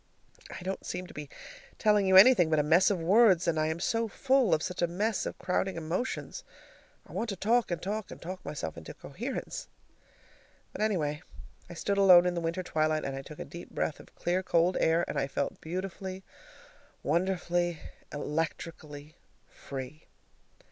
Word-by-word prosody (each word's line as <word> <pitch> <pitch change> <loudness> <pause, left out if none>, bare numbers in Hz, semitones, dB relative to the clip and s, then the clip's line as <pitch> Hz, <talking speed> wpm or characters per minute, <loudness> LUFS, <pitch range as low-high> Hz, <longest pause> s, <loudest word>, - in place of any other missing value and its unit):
I - - -8
don't 190 +1 -4
seem 180 +1 -4
to - - -13
be 150 -1 -7 0.5
telling 210 -2 +3
you 190 - +4
anything 190 -5 +8
but 155 - +2
a 150 - +3
mess 165 +5 +5
of 200 -4 0
words, 185 0 +5
I 155 -2 +2
am 160 +1 -2
so 230 +5 0
full 260 0 +2
of 160 -1 +2
such 180 -1 -4
a 175 - +3
mess 205 +5 -1
of - - -6
crowding 190 +1 -1
emotions. 180 - -3 0.6
I - - -16
want 230 - -2
to 200 - -2
talk 230 +5 +2
and 175 -2 -2
talk 210 +2 -4
and - - -9
talk 185 +2 -7
myself 80 - -5
into 80 - -9
coherence. - - -6 1.0
But, - - -7
anyway, 160 -8 0 0.5
I 175 - -8
stood 200 +4 -1
alone 180 -3 +8
in 180 - +1
the 170 - -2
winter 170 +3 -2
twilight, 155 -2 0
and 135 - -3
I 135 - -5
took 150 +2 -11
a - - -6
deep 170 +5 -10
breath 155 - -2
of - - -16
clear 180 +2 0
cold 175 0 +2
air, 165 +1 +3
and - - -2
I - - 0
felt 140 - -3
beautifully, 185 +2 -5 0.8
wonderfully, 175 +1 0 0.3
electrically 150 0 -4 0.3
free. 135 +2 -9
175 Hz, 175 wpm, -30 LUFS, 155-190 Hz, 1.0 s, anything